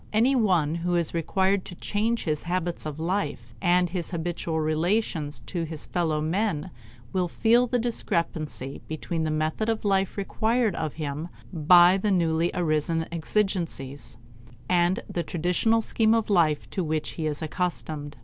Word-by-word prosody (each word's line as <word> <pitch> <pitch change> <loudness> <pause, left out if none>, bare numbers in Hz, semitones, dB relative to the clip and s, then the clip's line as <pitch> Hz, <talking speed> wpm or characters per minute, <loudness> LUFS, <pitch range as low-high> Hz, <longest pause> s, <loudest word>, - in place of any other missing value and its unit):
Any 235 +6 +3
one 180 - +2
who 175 +1 -1
is 170 -2 +2
required 190 +3 +1
to 175 - -9
change 220 +6 -1
his 150 -2 -1
habits 175 -2 -2
of 155 0 -6
life 155 - -2
and 180 0 +3
his 175 -1 -4
habitual 170 -1 -2
relations 155 0 0
to 175 - -4
his 160 -2 -5
fellow 160 -4 0
men 180 +1 -1 0.4
will 185 -1 +1
feel 235 +7 +3
the 245 - +1
discrepancy 165 - -2
between 160 +1 -3
the - - 0
method 155 +8 -1
of 225 -1 -1
life 195 -1 +1
required 220 +2 +1
of 155 -3 -3
him 150 +1 -4 0.3
by 175 +3 +6
the 210 - 0
newly 170 -3 +2
arisen 165 -1 0
exigencies, 165 - -2 0.5
and 175 +1 +2
the 175 - -2
traditional 180 +8 +1
scheme 220 0 +2
of 225 -2 0
life 160 -6 +3
to 190 - -1
which 155 -1 -1
he 160 -2 -3
is 150 +1 -3
accustomed. 155 -3 -3
175 Hz, 155 wpm, -26 LUFS, 155-195 Hz, 0.5 s, by